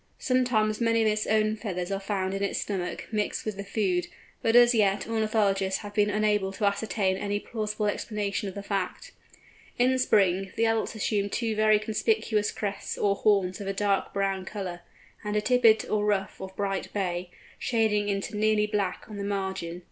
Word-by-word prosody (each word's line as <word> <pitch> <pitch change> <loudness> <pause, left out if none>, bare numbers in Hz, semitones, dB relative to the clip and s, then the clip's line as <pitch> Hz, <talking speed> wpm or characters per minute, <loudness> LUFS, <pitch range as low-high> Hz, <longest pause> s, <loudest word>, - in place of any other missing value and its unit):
Sometimes 240 -4 +1
many 230 -1 +3
of - - +2
its 215 0 0
own 215 0 +2
feathers 185 -4 -4
are 195 - -1
found 195 -1 -2
in 195 - -3
its 200 - -1
stomach, 185 -3 -3
mixed 210 -1 -1
with 215 -2 -3
the 200 - -5
food, 195 -3 0 0.3
but 225 +1 +2
as 240 0 +7
yet 205 -3 +2
ornithologists 215 -4 +1
have 205 -1 -8
been 210 0 +3
unable 210 -2 +1
to 205 +1 0
assign 200 -2 0
any 205 +1 -2
plausible 215 -1 -3
explanation 205 -1 -2
of 190 - -10
the 200 - -6
fact. 195 -3 -3 0.7
In 255 +1 +3
Spring, 195 -5 +2
the 230 - +2
adults 225 0 0
assume 205 -2 0
two 225 +1 -1
very 215 0 +4
conspicuous 215 0 0
crests 200 -2 -4
or 200 -1 +2
horns 195 -2 +2
of 200 - -5
a 195 - -1
dark 200 0 0
brown 195 -1 -1
colour, 185 -3 -5 0.4
and 210 0 -3
a - - +4
tippet 230 -2 +4
or 210 -1 0
ruff 200 -3 -1
of 190 0 -7
bright 195 -1 -2
bay, 180 -3 -2 0.3
shading 215 -3 +1
into 200 +2 -2
nearly 215 0 +2
black 205 -3 -2
on 210 - -8
the 200 - -4
margin. 190 -4 -3
205 Hz, 185 wpm, -27 LUFS, 195-215 Hz, 0.7 s, as